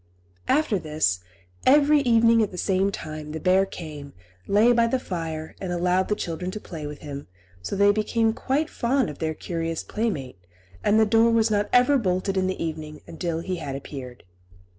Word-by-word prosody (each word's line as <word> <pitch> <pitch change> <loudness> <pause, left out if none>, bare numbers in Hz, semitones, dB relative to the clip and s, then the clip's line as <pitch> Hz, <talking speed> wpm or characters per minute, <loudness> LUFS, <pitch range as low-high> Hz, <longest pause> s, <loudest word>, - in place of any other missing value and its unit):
After 275 -9 +2
this, 150 - 0 0.4
every 295 +2 +5
evening 230 -3 +4
at 210 - +1
the 180 - -9
same 190 +1 +1
time 155 -4 -7
the 160 - -4
bear 190 +2 +3
came, 150 -6 -8 0.3
lay 215 +4 +5
by 235 -1 +3
the 260 - +1
fire, 165 -8 -5
and 185 -2 -3
allowed 180 +1 +1
the 210 - +1
children 175 0 -4
to 215 - -5
play 160 -7 -7
with 150 0 -8
him; 140 -1 -7 0.3
so 90 - -4
they 200 +1 +5
became 220 +2 +1
quite 280 +6 -1
fond 250 - 0
of 145 - -13
their 160 -1 -2
curious 165 -1 -3
playmate, 160 - -3 0.4
and 210 +1 +4
the 220 - +5
door 225 +2 +4
was 225 -1 +3
not 205 0 +1
ever 255 +3 +5
bolted 185 -2 -1
in 185 -1 +1
the 185 - -3
evening 155 -2 -5
until 165 0 -3
he 185 +1 -3
had 140 -5 -5
appeared. 135 -3 -8
185 Hz, 185 wpm, -25 LUFS, 155-225 Hz, 0.4 s, every